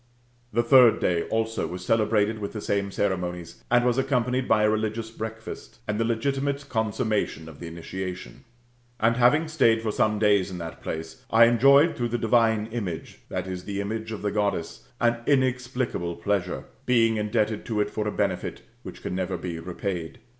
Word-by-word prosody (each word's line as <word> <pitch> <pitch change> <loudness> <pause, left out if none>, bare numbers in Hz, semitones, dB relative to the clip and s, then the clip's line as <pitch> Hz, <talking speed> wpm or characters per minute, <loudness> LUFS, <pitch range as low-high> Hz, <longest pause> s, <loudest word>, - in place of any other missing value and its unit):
The 120 +2 +2
third 120 -1 +6
day 85 -2 +1
also 115 0 -1
was 90 +1 -7
celebrated 110 -1 +2
with 100 -1 -5
the 110 - -4
same 100 -1 -1
ceremonies, 90 -4 -3
and 120 0 +4
was 125 +1 +2
accompanied 125 -1 0
by, 110 -1 +4
a 105 - +4
religious 110 +1 -2
breakfast, 110 0 -7
and 105 +1 -1
the - - +3
legitimate 135 +5 -1
consummation 110 - -1
of 80 -3 -12
the 85 - -7
initiation. 90 +2 -7 0.6
And 115 +1 +3
having 145 +7 +4
staid 115 -8 +3
for 110 - 0
some 105 0 +1
days 100 -3 +3
in 90 - -6
that 85 -1 -7
place, 80 0 -6
I 115 +1 +7
enjoyed 140 +7 +5
through 120 -1 -1
the 120 - -1
divine 115 -1 +3
image 100 -9 -5
\te, 95 0 -3
the 100 +2 -5
image 110 +2 -3
of 105 -2 -6
the 105 - 0
Goddess] 100 -1 -2
an 120 0 +2
inexplicable 130 -9 0
pleasure; 90 0 -1 0.2
being 115 -3 +3
indebted 105 0 0
to 110 -3 -2
it 105 0 0
for 105 -1 -2
a - - 0
benefit - - -2 0.2
which - - -10
can - - -3
never 95 0 -2
be 85 -1 -5
repaid. 90 +1 -4
110 Hz, 175 wpm, -26 LUFS, 95-120 Hz, 0.6 s, I